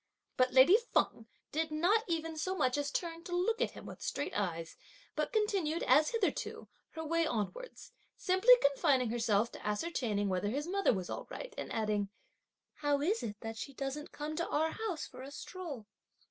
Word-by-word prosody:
But 255 Hz, 0 st, +3 dB
lady 280 Hz, -, +7 dB, 0.2 s
Feng 225 Hz, -, +2 dB, 0.2 s
did 320 Hz, +1 st, 0 dB
not 355 Hz, +9 st, +3 dB
even 325 Hz, -2 st, -2 dB
so 370 Hz, +4 st, -2 dB
much 255 Hz, -8 st, +2 dB
as 290 Hz, -1 st, -1 dB
turn 335 Hz, -1 st, -3 dB
to 350 Hz, -, -3 dB
look 450 Hz, +7 st, +1 dB
at -, -, +1 dB
him -, -, -9 dB
with -, -, -9 dB
straight 285 Hz, -, -3 dB
eyes; 165 Hz, -5 st, -2 dB, 0.4 s
but -, -, -1 dB
continued, 395 Hz, -8 st, +1 dB
as 300 Hz, +4 st, +5 dB
hitherto, 450 Hz, -4 st, -2 dB, 0.3 s
her 320 Hz, 0 st, -5 dB
way 330 Hz, +1 st, +2 dB
onwards, 315 Hz, -, -4 dB, 0.3 s
simply 380 Hz, +7 st, +6 dB
confining 275 Hz, -4 st, +3 dB
herself 230 Hz, -1 st, +2 dB
to -, -, -10 dB
ascertaining 210 Hz, -3 st, -1 dB
whether 190 Hz, +2 st, 0 dB
his 285 Hz, +6 st, -2 dB
mother 395 Hz, +3 st, +2 dB
was 185 Hz, -5 st, -3 dB
all -, -, -5 dB
right, -, -, -7 dB
and -, -, -5 dB
adding: 210 Hz, -2 st, 0 dB, 0.7 s
"How 290 Hz, -1 st, +1 dB
is 385 Hz, +10 st, +1 dB
it 210 Hz, -1 st, -5 dB
that 225 Hz, 0 st, -5 dB
she 275 Hz, +4 st, -6 dB
doesn't 275 Hz, +2 st, -4 dB
come 300 Hz, +1 st, -5 dB
to 340 Hz, -, -1 dB
our 320 Hz, +2 st, +1 dB
house 420 Hz, -8 st, -3 dB
for -, -, -11 dB
a 265 Hz, -, -7 dB
stroll?" 290 Hz, -, -7 dB
300 Hz, 185 wpm, -33 LUFS, 235-350 Hz, 0.7 s, lady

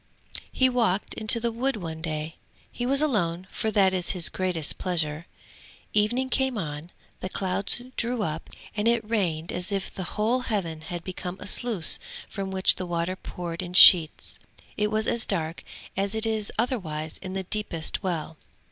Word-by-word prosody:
He 260 Hz, -, +3 dB
walked 230 Hz, -6 st, +1 dB
into 220 Hz, +2 st, +2 dB
the 235 Hz, 0 st, -1 dB
wood 260 Hz, +4 st, -1 dB
one 165 Hz, -5 st, -6 dB
day; 155 Hz, -1 st, -4 dB, 0.3 s
he 245 Hz, -, -3 dB
was 275 Hz, +3 st, +3 dB
alone, 185 Hz, -, 0 dB
for 220 Hz, -, -2 dB
that 195 Hz, -3 st, +3 dB
was 180 Hz, -2 st, +1 dB
his 180 Hz, -3 st, +2 dB
greatest 180 Hz, -5 st, -1 dB
pleasure. 165 Hz, -3 st, -1 dB, 0.7 s
Evening 235 Hz, +5 st, +2 dB
came 265 Hz, -2 st, +1 dB
on, 155 Hz, -2 st, -5 dB, 0.3 s
the 185 Hz, -, -4 dB
clouds 190 Hz, +3 st, 0 dB, 0.2 s
drew 235 Hz, -2 st, +1 dB
up 160 Hz, -3 st, -4 dB, 0.3 s
and 210 Hz, +1 st, 0 dB
it 235 Hz, -2 st, +2 dB
rained 175 Hz, -7 st, -1 dB
as 180 Hz, +3 st, -2 dB
if 195 Hz, -1 st, -2 dB
the 190 Hz, +2 st, -5 dB
whole 225 Hz, +4 st, +2 dB
heaven 190 Hz, -10 st, -2 dB
had 175 Hz, +1 st, -6 dB
become 185 Hz, 0 st, -6 dB
a -, -, -8 dB
sluice 205 Hz, -6 st, +5 dB, 0.3 s
from 195 Hz, -2 st, -5 dB
which 190 Hz, 0 st, +3 dB
the 185 Hz, -, -4 dB
water 170 Hz, +1 st, -1 dB
poured 175 Hz, -2 st, -6 dB
in 180 Hz, -1 st, -7 dB
sheets; 170 Hz, -4 st, +7 dB, 0.4 s
it 210 Hz, 0 st, 0 dB
was 215 Hz, +1 st, 0 dB
as 235 Hz, -, +1 dB
dark 165 Hz, -4 st, -1 dB, 0.3 s
as 195 Hz, +2 st, -1 dB
it 220 Hz, 0 st, +1 dB
is 220 Hz, -2 st, -1 dB
otherwise 160 Hz, -, -2 dB
in 185 Hz, -1 st, -7 dB
the 190 Hz, 0 st, -3 dB
deepest 180 Hz, -5 st, -3 dB
well. 165 Hz, -5 st, -3 dB
190 Hz, 175 wpm, -26 LUFS, 170-220 Hz, 0.7 s, sheets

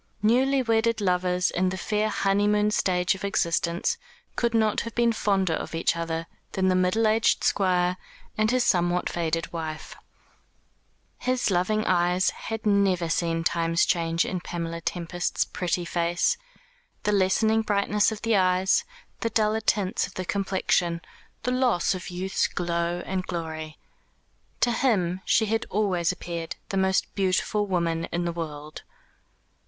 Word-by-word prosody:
Newly 260 Hz, +4 st, +3 dB
wedded 230 Hz, 0 st, +1 dB
lovers 180 Hz, -2 st, +1 dB
in 185 Hz, +1 st, +1 dB
the 185 Hz, -, -4 dB
fair 210 Hz, +3 st, 0 dB
honeymoon 210 Hz, +1 st, +2 dB
stage 180 Hz, -3 st, +1 dB
of 190 Hz, -, -9 dB
existence 170 Hz, -3 st, 0 dB, 0.4 s
could 235 Hz, -1 st, 0 dB
not 220 Hz, -2 st, +2 dB
have 230 Hz, -, -7 dB
been 235 Hz, -1 st, +3 dB
fonder 195 Hz, -5 st, +1 dB
of 160 Hz, -, -4 dB
each 165 Hz, -, +1 dB
other 165 Hz, 0 st, -3 dB, 0.3 s
than 190 Hz, -1 st, +1 dB
the 185 Hz, -, +3 dB
middle 185 Hz, +5 st, +2 dB
aged 220 Hz, +1 st, +2 dB
Squire 180 Hz, -2 st, +2 dB, 0.4 s
and 215 Hz, 0 st, +2 dB
his 255 Hz, +1 st, +2 dB
somewhat 175 Hz, -2 st, +1 dB
faded 165 Hz, -1 st, -2 dB
wife. 160 Hz, -2 st, -5 dB, 1.2 s
His 255 Hz, -4 st, 0 dB
loving 205 Hz, +4 st, +1 dB
eyes 180 Hz, +1 st, +2 dB
had 225 Hz, 0 st, -6 dB
never 195 Hz, -5 st, +2 dB
seen 165 Hz, 0 st, 0 dB
Time's 165 Hz, 0 st, +2 dB
changes 165 Hz, 0 st, +1 dB
in 185 Hz, -, -2 dB
Pamela 170 Hz, -1 st, -5 dB
Tempest's 175 Hz, 0 st, -2 dB
pretty 175 Hz, -1 st, -2 dB
face, 175 Hz, -, +1 dB, 0.7 s
the 210 Hz, -, +1 dB
lessening 210 Hz, +3 st, +3 dB
brightness 205 Hz, 0 st, +1 dB
of 215 Hz, -, -7 dB
the 225 Hz, -1 st, +2 dB
eyes, 185 Hz, 0 st, +3 dB, 0.4 s
the 230 Hz, -, -1 dB
duller 220 Hz, 0 st, +1 dB
tints 200 Hz, -4 st, 0 dB
of 190 Hz, -, -16 dB
the 185 Hz, -, -4 dB
complexion, 185 Hz, -3 st, 0 dB, 0.4 s
the 250 Hz, -, 0 dB
loss 250 Hz, -9 st, +2 dB
of 185 Hz, -1 st, -6 dB
youth's 185 Hz, +2 st, -1 dB
glow 170 Hz, 0 st, -2 dB
and 185 Hz, -1 st, -3 dB
glory. 160 Hz, -2 st, -5 dB, 0.8 s
To 240 Hz, -, +3 dB
him 190 Hz, -8 st, +1 dB
she 220 Hz, -, +3 dB
had 225 Hz, +1 st, -1 dB
always 185 Hz, -5 st, +1 dB
appeared 170 Hz, -2 st, -5 dB
the 195 Hz, -, -2 dB
most 190 Hz, 0 st, +1 dB
beautiful 200 Hz, +2 st, 0 dB
woman 170 Hz, -3 st, 0 dB
in 175 Hz, 0 st, -3 dB
the 170 Hz, -, -1 dB
world. 155 Hz, -2 st, -6 dB
185 Hz, 150 wpm, -26 LUFS, 170-210 Hz, 1.2 s, Newly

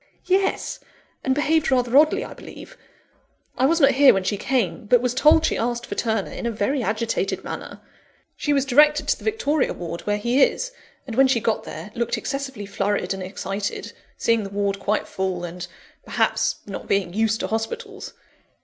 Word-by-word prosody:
"Yes; 380 Hz, +2 st, 0 dB, 0.4 s
and 260 Hz, -1 st, +1 dB
behaved 310 Hz, +2 st, +2 dB
rather 250 Hz, -2 st, +1 dB
oddly, 310 Hz, -, +5 dB
I -, -, -9 dB
believe. -, -, -12 dB, 0.8 s
I 260 Hz, -, +3 dB
was 330 Hz, +3 st, +2 dB
not 275 Hz, -2 st, +6 dB
here 275 Hz, -2 st, +6 dB
when 195 Hz, -, 0 dB
she 205 Hz, -, 0 dB
came, 220 Hz, -2 st, -1 dB
but 245 Hz, +2 st, +5 dB
was 250 Hz, 0 st, -1 dB
told 305 Hz, +4 st, +5 dB
she -, -, 0 dB
asked 240 Hz, +1 st, -1 dB
for -, -, -5 dB
Turner, 220 Hz, -4 st, -1 dB
in -, -, -4 dB
a -, -, 0 dB
very 240 Hz, +6 st, -1 dB
agitated 225 Hz, 0 st, -1 dB
manner. -, -, -7 dB, 0.5 s
She 295 Hz, -, -2 dB
was 280 Hz, -2 st, +2 dB
directed 300 Hz, +3 st, +4 dB
to -, -, +2 dB
the -, -, -14 dB
Victoria 315 Hz, -10 st, 0 dB
Ward, 170 Hz, 0 st, -6 dB
where 205 Hz, 0 st, +1 dB
he 240 Hz, +6 st, +1 dB
is; -, -, +2 dB, 0.3 s
and 235 Hz, -4 st, -6 dB
when 270 Hz, +2 st, +6 dB
she 260 Hz, -3 st, +2 dB
got 220 Hz, 0 st, -1 dB
there, 210 Hz, -, -8 dB
looked 235 Hz, 0 st, -1 dB
excessively 270 Hz, -6 st, -4 dB
flurried 200 Hz, 0 st, -1 dB
and 190 Hz, -, -6 dB
excited 195 Hz, +2 st, -4 dB, 0.2 s
seeing 230 Hz, -2 st, +2 dB
the 195 Hz, -, -6 dB
Ward 200 Hz, 0 st, -1 dB
quite 210 Hz, +2 st, -1 dB
full, 190 Hz, -2 st, -3 dB
and, 175 Hz, +1 st, -6 dB, 0.4 s
perhaps, -, -, +1 dB
not 195 Hz, -, -7 dB
being 190 Hz, -3 st, 0 dB
used 220 Hz, +1 st, +1 dB
to -, -, -1 dB
hospitals. 400 Hz, -, -4 dB
235 Hz, 185 wpm, -23 LUFS, 205-280 Hz, 0.8 s, not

